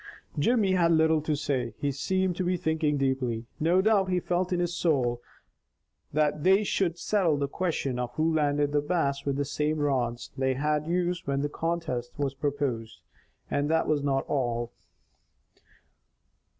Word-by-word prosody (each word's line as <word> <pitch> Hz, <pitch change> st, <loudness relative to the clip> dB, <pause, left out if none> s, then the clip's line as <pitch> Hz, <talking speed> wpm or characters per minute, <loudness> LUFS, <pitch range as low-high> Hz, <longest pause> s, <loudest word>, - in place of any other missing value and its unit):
Jimmy 210 Hz, +3 st, +3 dB
had 170 Hz, -2 st, +3 dB
little 160 Hz, -1 st, +3 dB
to 155 Hz, 0 st, -1 dB
say. 140 Hz, -6 st, -2 dB
He 145 Hz, -, -1 dB
seemed 185 Hz, +6 st, 0 dB
to 185 Hz, -, 0 dB
be 180 Hz, 0 st, 0 dB
thinking 160 Hz, -2 st, 0 dB
deeply. 130 Hz, -4 st, -1 dB
No 175 Hz, +4 st, +3 dB
doubt 200 Hz, -3 st, +3 dB
he 180 Hz, -1 st, +2 dB
felt 180 Hz, +1 st, -1 dB
in 180 Hz, -, +1 dB
his 175 Hz, 0 st, -1 dB
soul 125 Hz, -9 st, +1 dB, 0.9 s
that 150 Hz, 0 st, +1 dB
they 190 Hz, +3 st, +5 dB
should 180 Hz, -4 st, 0 dB
settle 175 Hz, -4 st, +1 dB
the 140 Hz, 0 st, -1 dB
question 140 Hz, -6 st, -2 dB
of 125 Hz, -1 st, -2 dB
who 160 Hz, +1 st, +1 dB
landed 145 Hz, -1 st, +1 dB
the 145 Hz, 0 st, +2 dB
Bass 145 Hz, -3 st, -1 dB
with 140 Hz, -1 st, 0 dB
the 140 Hz, +1 st, -1 dB
same 150 Hz, +2 st, -1 dB
rods 125 Hz, -5 st, -1 dB
they 130 Hz, 0 st, 0 dB
had 150 Hz, +2 st, 0 dB
used 175 Hz, -1 st, -1 dB
when 140 Hz, 0 st, 0 dB
the 145 Hz, -, -1 dB
contest 160 Hz, -7 st, -3 dB
was 140 Hz, -2 st, -1 dB
proposed, 135 Hz, -5 st, -3 dB, 0.5 s
and 145 Hz, +1 st, 0 dB
that 160 Hz, 0 st, +2 dB
was 150 Hz, -2 st, +1 dB
not 135 Hz, -1 st, 0 dB
all. 120 Hz, -4 st, -1 dB
150 Hz, 165 wpm, -28 LUFS, 135-170 Hz, 0.9 s, they